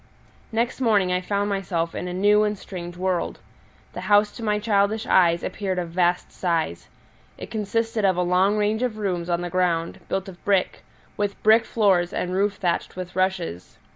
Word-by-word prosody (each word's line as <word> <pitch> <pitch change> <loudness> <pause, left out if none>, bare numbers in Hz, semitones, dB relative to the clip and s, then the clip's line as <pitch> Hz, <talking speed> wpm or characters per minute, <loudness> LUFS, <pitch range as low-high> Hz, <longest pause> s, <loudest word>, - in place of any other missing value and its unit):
Next 235 +3 -1
morning 205 -6 +3
I 180 - 0
found 200 +2 -1
myself 175 -4 -2
in 180 - -4
a - - -4
new 205 +3 +4
and 210 -1 0
strange 175 -2 -8
world. 185 -1 -1 0.6
The 180 - -6
house 205 +2 +4
to 235 - -10
my 210 -1 +1
childish 210 0 +1
eyes 170 -2 +3
appeared 190 -2 -3
of 175 -2 -2
vast 175 0 +1
size: 165 - -2 0.5
it - - -9
consisted 225 +1 -1
of 190 -2 +3
a 180 - +2
long 185 +4 +2
range 210 +2 +1
of 245 -4 -1
rooms 180 -4 -2
on 170 0 0
the 175 -1 -4
ground, 170 -2 0
built 190 0 -2
of 185 -2 -12
brick, 195 -2 +1 0.3
with 205 -1 -2
brick 220 +1 +5
floors 190 -7 +2
and 180 - -2
roof 200 +2 +1
thatched 175 -3 -2
with 180 0 -7
rushes. 185 - -2
190 Hz, 185 wpm, -24 LUFS, 180-210 Hz, 0.6 s, brick